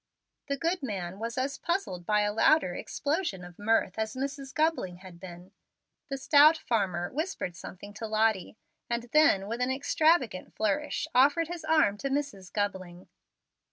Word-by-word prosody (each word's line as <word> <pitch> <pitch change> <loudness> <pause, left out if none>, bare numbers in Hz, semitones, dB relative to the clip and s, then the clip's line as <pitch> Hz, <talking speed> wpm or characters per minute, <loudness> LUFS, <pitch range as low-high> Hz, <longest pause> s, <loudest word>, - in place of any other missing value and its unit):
The 280 -1 -1
good 335 +5 -1
man 195 -7 -4
was 230 +2 -4
as 270 +2 -2
puzzled 340 - -2
by 210 0 +3
a 205 0 0
louder 225 - +3
explosion 285 - -2
of 175 +1 -14
mirth 225 +1 +1
as 220 +1 -2
Mrs. 275 0 -4
Gubling 310 - 0
had 180 -1 -13
been. 180 0 -11 0.6
The 275 - -3
stout 295 +3 +6
farmer 190 - -1
whispered 310 - -3
something 200 +3 -10
to 220 +2 -6
Lottie, 215 -2 0 0.3
and 235 0 -1
then, 250 -11 +4
with 230 +3 -4
an 250 - +1
extravagant 275 - +1
flourish, 215 +7 -1
offered 290 +6 +4
his 345 -2 -6
arm 310 -11 +3
to 275 - -2
Mrs. 270 -10 -3
Gubling. 185 -3 -4
225 Hz, 155 wpm, -29 LUFS, 190-290 Hz, 0.6 s, stout